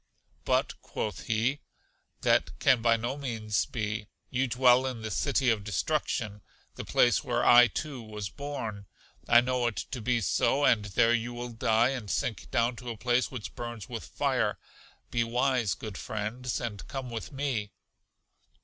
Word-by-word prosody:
But, -, -, 0 dB
quoth 105 Hz, -, -5 dB
he, 120 Hz, +6 st, +1 dB, 0.6 s
that -, -, +2 dB
can 130 Hz, -4 st, +4 dB
by 115 Hz, 0 st, +4 dB
no 120 Hz, +5 st, -3 dB
means 110 Hz, -7 st, -1 dB
be; 105 Hz, -2 st, -3 dB, 0.2 s
you 130 Hz, +1 st, +1 dB
dwell 125 Hz, +1 st, +4 dB
in 120 Hz, -4 st, -5 dB
the 110 Hz, -, -4 dB
City 130 Hz, +5 st, +2 dB
of 105 Hz, -3 st, -1 dB
Destruction, 105 Hz, -2 st, -1 dB, 0.3 s
the -, -, -6 dB
place 120 Hz, -, +3 dB
where 120 Hz, -3 st, 0 dB
I, 120 Hz, 0 st, +8 dB
too, 140 Hz, -1 st, -5 dB
was 105 Hz, -2 st, -6 dB
born. 110 Hz, -5 st, -6 dB, 0.4 s
I 120 Hz, 0 st, +7 dB
know 125 Hz, -1 st, 0 dB
it 115 Hz, -, -2 dB, 0.2 s
to 125 Hz, -, -4 dB
be 120 Hz, +2 st, +1 dB
so, 140 Hz, +7 st, +2 dB
and 105 Hz, -3 st, +4 dB
there 110 Hz, +4 st, +3 dB
you 120 Hz, +1 st, -1 dB
will 120 Hz, 0 st, -5 dB
die 115 Hz, +1 st, +2 dB
and 125 Hz, -6 st, -4 dB
sink 110 Hz, -, -2 dB
down 120 Hz, +1 st, +1 dB
to 125 Hz, -1 st, -7 dB
a 115 Hz, -, -5 dB
place 125 Hz, +2 st, +1 dB
which 125 Hz, -5 st, -7 dB
burns 120 Hz, -3 st, -6 dB
with -, -, -5 dB
fire; -, -, 0 dB, 0.5 s
be 120 Hz, -1 st, +2 dB
wise, 120 Hz, -2 st, +1 dB
good 105 Hz, -4 st, -7 dB
friends, 110 Hz, +4 st, -3 dB
and 110 Hz, -4 st, -5 dB
come 130 Hz, -2 st, -5 dB
with 115 Hz, -1 st, -5 dB
me. 135 Hz, -7 st, -2 dB
120 Hz, 165 wpm, -29 LUFS, 110-125 Hz, 0.6 s, I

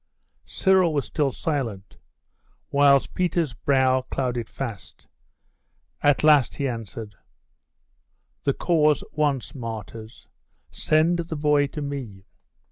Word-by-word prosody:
Cyril 185 Hz, -4 st, +2 dB
was 140 Hz, -, 0 dB
still 145 Hz, -3 st, -1 dB
silent; 115 Hz, -11 st, -4 dB, 0.7 s
whilst 140 Hz, -1 st, +4 dB
Peter's 170 Hz, -6 st, 0 dB
brow 130 Hz, 0 st, +2 dB
clouded 125 Hz, -3 st, -3 dB
fast. 115 Hz, -8 st, -8 dB, 0.9 s
At 145 Hz, 0 st, +3 dB
last 150 Hz, -5 st, +5 dB
he 140 Hz, -, -2 dB
answered 115 Hz, -3 st, -6 dB, 1.3 s
'The 140 Hz, -, +2 dB
cause 155 Hz, -3 st, +2 dB
wants 145 Hz, -4 st, -1 dB
martyrs. 115 Hz, -3 st, -8 dB, 0.4 s
Send 160 Hz, +3 st, +2 dB
the 165 Hz, -1 st, -4 dB
boy 145 Hz, -1 st, +2 dB
to 150 Hz, +1 st, -6 dB
me. 125 Hz, -9 st, -6 dB
140 Hz, 105 wpm, -24 LUFS, 120-150 Hz, 1.3 s, last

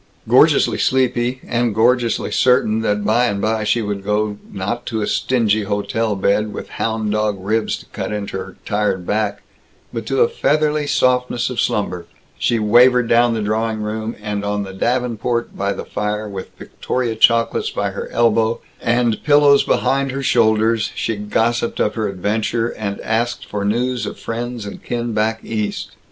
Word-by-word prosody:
Gorgeously -, -, +4 dB
sleepy 125 Hz, -1 st, +1 dB
and 120 Hz, -3 st, 0 dB
gorgeously 120 Hz, +1 st, +2 dB
certain 125 Hz, -4 st, +3 dB
that 105 Hz, -2 st, 0 dB
by 115 Hz, +4 st, +3 dB
and 100 Hz, -3 st, -2 dB
by 110 Hz, +1 st, 0 dB
she 115 Hz, +2 st, +1 dB
would 100 Hz, -1 st, -3 dB
go, 105 Hz, 0 st, -1 dB
not 105 Hz, +6 st, -4 dB
to 110 Hz, -2 st, -2 dB
a -, -, 0 dB
stingy 110 Hz, -4 st, +1 dB
hotel 105 Hz, +2 st, -1 dB
bed, 100 Hz, +2 st, +1 dB
with -, -, -7 dB
hound 110 Hz, -2 st, -1 dB
dog 105 Hz, -1 st, 0 dB
ribs 110 Hz, +4 st, -1 dB
to -, -, -14 dB
cut -, -, -5 dB
into 105 Hz, -1 st, -4 dB
her -, -, -8 dB
tired 105 Hz, -3 st, -1 dB
back, 105 Hz, 0 st, -1 dB, 0.5 s
but 115 Hz, -2 st, -5 dB
to 135 Hz, -1 st, +1 dB
a -, -, +6 dB
feathery 150 Hz, +1 st, +1 dB
softness 125 Hz, -2 st, +1 dB
of 125 Hz, -, -1 dB
slumber 90 Hz, -4 st, -2 dB, 0.3 s
she 120 Hz, -, +1 dB
wavered 120 Hz, +3 st, +5 dB
down 120 Hz, 0 st, +4 dB
to 110 Hz, -, -2 dB
the -, -, -2 dB
drawing 110 Hz, 0 st, -1 dB
room, 110 Hz, +1 st, -4 dB
and 105 Hz, -1 st, -3 dB
on 105 Hz, 0 st, -1 dB
the 95 Hz, -1 st, -8 dB
davenport, 120 Hz, +2 st, -1 dB
by 100 Hz, 0 st, -1 dB
the -, -, -5 dB
fire, 105 Hz, +1 st, -3 dB
with 95 Hz, -2 st, -7 dB
Victoria 125 Hz, -3 st, -3 dB
chocolates 115 Hz, +1 st, +3 dB
by -, -, -2 dB
her -, -, -6 dB
elbow, 115 Hz, -1 st, +2 dB, 0.2 s
and 120 Hz, -2 st, +1 dB
pillows 145 Hz, -1 st, +5 dB
behind 135 Hz, 0 st, +1 dB
her 135 Hz, +1 st, -4 dB
shoulders, 110 Hz, -2 st, +2 dB
she 115 Hz, -, -1 dB
gossiped 115 Hz, +3 st, -1 dB
of 105 Hz, -, +1 dB
her 110 Hz, -2 st, -1 dB
adventure, 110 Hz, +4 st, -1 dB
and 100 Hz, -3 st, -4 dB
asked 115 Hz, +2 st, -1 dB
for 105 Hz, -1 st, -4 dB
news 120 Hz, +4 st, 0 dB
of -, -, -6 dB
friends 120 Hz, -1 st, -5 dB
and 100 Hz, -, -8 dB
kin 120 Hz, -1 st, -3 dB
back 110 Hz, +1 st, 0 dB
East. 105 Hz, -2 st, -3 dB
110 Hz, 170 wpm, -19 LUFS, 105-120 Hz, 0.5 s, a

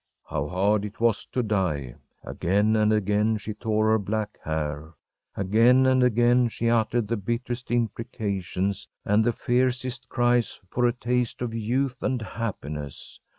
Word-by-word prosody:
How 70 Hz, -, -3 dB
hard 100 Hz, +4 st, +1 dB
it 105 Hz, 0 st, -7 dB
was 115 Hz, -3 st, +1 dB
to 125 Hz, -, -1 dB
die! 85 Hz, -, -1 dB, 0.3 s
Again 105 Hz, +5 st, +1 dB
and 110 Hz, 0 st, +3 dB
again 105 Hz, +1 st, +2 dB
she 110 Hz, 0 st, -5 dB
tore 110 Hz, 0 st, +1 dB
her 110 Hz, -, +4 dB
black 105 Hz, +1 st, -3 dB
hair. 80 Hz, 0 st, -3 dB, 0.4 s
Again 115 Hz, +7 st, +4 dB
and 130 Hz, 0 st, +4 dB
again 120 Hz, 0 st, +4 dB
she 115 Hz, +1 st, -1 dB
uttered 115 Hz, -1 st, +1 dB
the 115 Hz, +2 st, -1 dB
bitterest 120 Hz, +4 st, -3 dB
imprecations 100 Hz, -5 st, -2 dB, 0.2 s
and 105 Hz, +2 st, +3 dB
the 120 Hz, -, +2 dB
fiercest 125 Hz, 0 st, -1 dB
cries 120 Hz, -1 st, +1 dB
for 125 Hz, 0 st, +2 dB
a -, -, +3 dB
taste 125 Hz, 0 st, -1 dB
of 115 Hz, -2 st, -3 dB
youth 125 Hz, +4 st, -1 dB
and 130 Hz, -1 st, 0 dB
happiness. 75 Hz, -, -6 dB
110 Hz, 150 wpm, -26 LUFS, 100-120 Hz, 0.4 s, her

